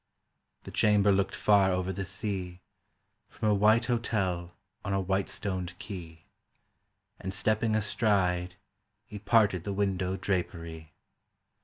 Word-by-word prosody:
The - - -9
chamber 105 -1 +4
looked 100 0 +1
far 100 -2 +4
over 90 0 -1
the 95 +1 -4
sea 95 -4 -4 0.7
From 110 - -1
a - - +4
white 110 +4 +4
hotel 95 -8 -1 0.3
on 100 - -2
a 95 - +1
white 95 +1 -1
stoned 95 -3 -3
quay, 85 -6 -9 0.9
And 95 - -4
stepping 110 +2 +1
a 110 - +1
stride 90 -4 +1 0.5
He 105 0 -8
parted 100 -4 +3
the 100 - -3
window 95 -1 -1
drapery. 85 -4 -4
95 Hz, 130 wpm, -29 LUFS, 90-105 Hz, 0.9 s, chamber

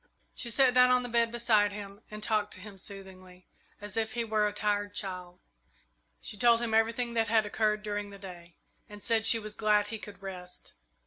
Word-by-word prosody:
She 240 - -2
sat 255 +2 +4
down 250 0 +6
on 250 0 +4
the 245 - -5
bed 235 -1 +2
beside 225 -3 +3
him 200 0 -9
and 215 0 -8
talked 210 -1 0
to - - -9
him 195 0 -10
soothingly, 185 -2 -10 0.3
as 205 -1 -5
if 220 -1 -1
he 235 0 -1
were 215 -2 +1
a - - -2
tired 205 0 -1
child. 180 -2 -5 0.8
She - - -4
told 235 +2 +5
him 235 -2 -2
everything 230 +2 +1
that 225 -1 +1
had 220 0 +3
occurred 210 0 0
during 205 -1 -3
the 200 - -11
day, 175 -3 -11 0.3
and 205 -1 -9
said 225 -1 +3
she 230 - +7
was 215 -1 -6
glad 210 -1 +2
he 225 0 -5
could 205 -2 -11
rest. 180 -2 -7
210 Hz, 205 wpm, -30 LUFS, 200-225 Hz, 0.8 s, she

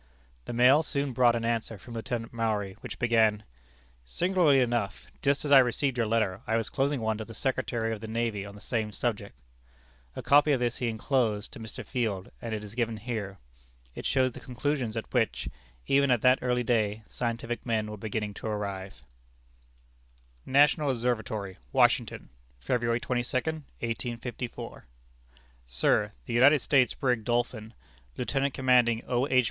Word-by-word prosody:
The - - -5
mail 125 +5 +6
soon 140 -4 -2
brought 120 -1 +4
an 115 -1 -2
answer 115 -1 -1
from 115 +5 -12
Lieutenant 115 0 -4
Maury, 110 -4 -1
which - - -8
began: 110 -3 +3 0.6
"Singularly 170 - +3
enough, 115 - -1 0.2
just 140 +2 +1
as 145 - -2
I 140 - +10
received 130 +1 +1
your 115 -3 0
letter, 110 -3 0
I 115 - +2
was 115 - -2
closing 140 -1 0
one 110 -1 -1
to - - -3
the 115 - -10
Secretary 120 -4 -1
of 105 - -7
the 110 - -6
Navy 110 -2 -1
on 100 0 -9
the 105 - -13
same 110 -3 -2
subject." 105 - -3 0.8
A - - -6
copy 145 +1 +5
of 130 - +1
this 120 -1 -1
he 125 - -1
inclosed 110 -2 0
to 135 - -9
Mr. 110 -1 -8
Field, 110 -7 -2
and 115 - -5
it 110 -1 -3
is 105 0 -8
given 115 -2 -1
here. 105 -4 -5 0.6
It - - -4
shows 130 -2 +2
the - - -10
conclusions 130 -2 -2
at 110 - -3
which, 120 -3 0 0.4
even 140 0 +3
at 125 -3 +2
that 130 0 +5
early 125 -1 +1
day, 110 -2 0
scientific 120 0 -3
men 110 -3 0
were - - -5
beginning 105 0 -3
to - - -4
arrive: 100 -5 -4 1.4
"National 145 +2 +4
Observatory, 110 -6 -2
Washington, - - +2 0.3
February 115 - 0
22, 120 0 -2 0.5
1854. 120 - -5 0.8
"Sir: - - +1
The - - -5
United 130 +3 +5
States 135 -4 +3
brig 125 -5 0
Dolphin, 120 -1 -2 0.4
Lieutenant 135 +2 -1
Commanding 125 -3 +3
O. 125 +2 +1
H. 130 - +4
115 Hz, 165 wpm, -28 LUFS, 110-125 Hz, 1.4 s, I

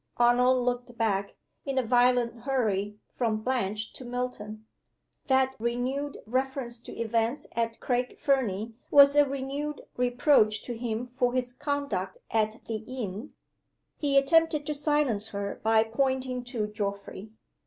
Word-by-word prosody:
Arnold 245 +1 +4
looked 245 -1 -2
back, 200 -3 0 0.3
in 275 -2 -3
a 260 - +3
violent 245 0 +3
hurry, 210 -6 0 0.2
from 220 -3 -1
Blanche 220 -4 -1
to - - -9
Milton. 240 -3 -5 0.6
That 265 0 +3
renewed 255 +5 -2
reference 255 0 -2
to - - -10
events 230 +4 0
at 230 0 -2
Craig 250 0 -1
Fernie 230 -6 0 0.2
was 280 0 +7
a 290 -1 +5
renewed 280 +2 -4 0.2
reproach 245 -3 +3
to 240 - -5
him 230 0 -3
for 245 0 +2
his 250 -1 -1
conduct 280 -10 -2
at 220 0 0
the 225 - -3
inn. 225 0 -6 0.7
He 280 -2 +2
attempted 305 +1 +3
to 300 - -1
silence 285 -7 +1
her 200 -2 -4
by 220 0 +4
pointing 255 +2 -1
to 240 -4 -2
Geoffrey. 200 0 -5
245 Hz, 135 wpm, -28 LUFS, 220-265 Hz, 0.7 s, was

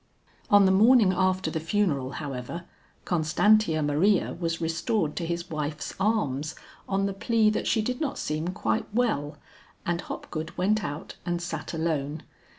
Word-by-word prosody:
On 205 -1 +7
the 190 - +5
morning 215 0 +6
after 185 -2 +1
the 160 - -2
funeral, 155 -7 0
however, 140 +3 -5 0.4
Constantia 165 +1 +3
Maria 165 +8 +2
was 165 -1 -1
restored 165 +1 -1
to 170 - -2
his 170 0 -4
wife's 150 -1 -3
arms 155 -9 0 0.3
on 195 0 +1
the 200 - -1
plea 215 +2 +2
that - - -2
she 220 - +2
did 250 +5 -3
not 285 -3 -1
seem 155 +2 -2
quite 110 -12 -1
well, 190 -12 0 0.5
and 170 0 0
Hopgood 160 +1 -6
went 205 +4 +2
out 145 +1 -6
and 175 -1 -1
sat 165 -3 -5
alone. 155 -2 -2
170 Hz, 155 wpm, -27 LUFS, 155-205 Hz, 0.5 s, On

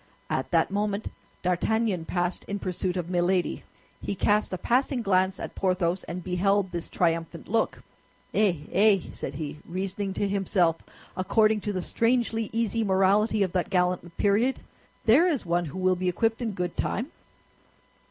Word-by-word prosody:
At - - -1
that - - +2
moment 205 +1 -1 0.3
D'Artagnan 185 0 0
passed 175 +1 -1
in 200 - -3
pursuit 185 -1 -2
of 175 -2 -3
Milady; 180 0 0 0.4
he 200 - -3
cast 210 +2 +2
a 185 - -2
passing 250 +3 +1
glance 190 -1 +2
at - - -6
Porthos, 185 -1 0
and 175 +1 -6
beheld 190 +2 +1
this 170 -1 -5
triumphant 165 -1 -1
look. 225 +2 0 0.5
"Eh, 190 -8 +2
eh!" 205 0 +5
said - - -5
he, 150 0 -5
reasoning 190 +2 -4
to 205 - 0
himself 190 -4 +2 0.4
according 215 +3 +2
to 210 - -2
the 185 -3 -2
strangely 230 -1 +1
easy 230 0 0
morality 200 +2 +3
of 185 - -1
that 180 -1 -1
gallant 180 -2 0
period, 215 +6 +2 0.5
"there 265 +10 +6
is 295 - 0
one 175 0 +1
who 150 +3 -7
will 185 0 +2
be 180 0 0
equipped 225 +6 0
in 225 -3 -2
good 180 -2 -3
time!" 245 +9 -2
190 Hz, 160 wpm, -27 LUFS, 180-215 Hz, 0.5 s, there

